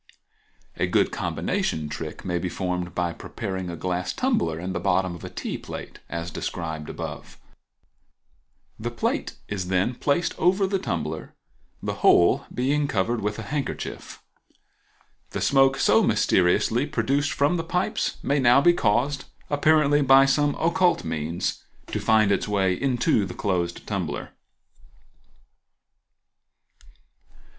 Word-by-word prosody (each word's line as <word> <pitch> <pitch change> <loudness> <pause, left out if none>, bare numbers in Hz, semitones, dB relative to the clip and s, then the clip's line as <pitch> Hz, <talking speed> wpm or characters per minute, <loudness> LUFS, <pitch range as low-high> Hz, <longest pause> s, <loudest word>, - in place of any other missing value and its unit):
A - - +1
good - - +2
combination 75 -1 -2
trick 75 +1 -6
may 90 -2 -1
be 90 - -2
formed 90 -1 -3
by 90 -1 0
preparing 95 0 -5
a 85 - -5
glass 90 +1 -2
tumbler 235 - 0
and 90 +3 -4
the - - -2
bottom 95 -2 +1
of 85 - -10
a - - -6
tea - - -5
plate, - - -8
as 85 0 -4
above - - -18
described; 80 -3 -5 1.8
the 115 +2 -3
plate 120 - -2
is 95 -3 -3
then 95 +6 +1
placed 145 +7 0
over 190 +3 +3
the 195 0 0
tumbler, 80 - -4 0.5
the - - -2
whole 85 - +5
being 140 +4 0
covered 110 +1 0
with 105 +1 -2
a 115 - -5
handkerchief. 145 +2 -5 1.1
The - - -2
smoke 135 -1 +4
so - - +4
mysteriously 105 +9 +2
produced 140 +2 0
from 145 +5 +2
the 165 - -2
pipes 180 +3 -1
may 140 +1 +1
now 125 0 +6
be 175 +5 +5
caused, 135 +2 +1 0.3
apparently 145 0 +4
by 135 0 +7
some 145 +1 +2
occult 175 +2 +2
means, 80 +1 -3 0.2
to - - -3
find 110 -2 +3
its 100 - 0
way 95 -3 +2
into 120 -1 +1
the 95 - -6
closed 90 -3 -2
tumbler. - - -3
110 Hz, 135 wpm, -25 LUFS, 90-145 Hz, 1.8 s, by